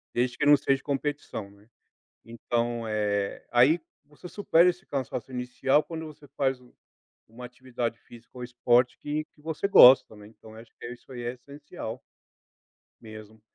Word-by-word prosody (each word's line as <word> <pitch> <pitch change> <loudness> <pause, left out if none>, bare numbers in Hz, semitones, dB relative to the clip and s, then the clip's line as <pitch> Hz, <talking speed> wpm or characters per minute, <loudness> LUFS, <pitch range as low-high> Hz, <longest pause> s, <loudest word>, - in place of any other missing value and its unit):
desde 120 0 0
que 145 - 0
não 145 -1 +8
seja 135 0 0
competição, 140 -8 -4
né. 100 +3 -23 0.6
Então, 115 0 -3
eh, 105 -2 -2
aí 135 +8 +4 0.3
você 150 +4 -13
supera 180 -3 +3
esse 180 +2 -11
cansaço 130 -2 -4
inicial 125 +3 0
quando 160 -1 -7
você 150 -1 -13
faz 135 -2 +1
u 125 -1 -22 0.5
uma 120 +3 -12
atividade 125 -2 -5
física 120 -1 -17
ou - - -7
esporte 120 0 +2
que 150 +1 -3
que 150 - -27
você 160 +5 -3
gosta, 130 -8 +8
também, 105 0 -14
então 110 0 -16
eu 110 - -11
acho 115 - -22
que - - -7
isso 125 +2 -11
aí 120 - -7
é 120 +1 -3
essencial 140 -2 -9 1.0
mesmo. 110 0 -12
125 Hz, 165 wpm, -27 LUFS, 115-145 Hz, 1.0 s, não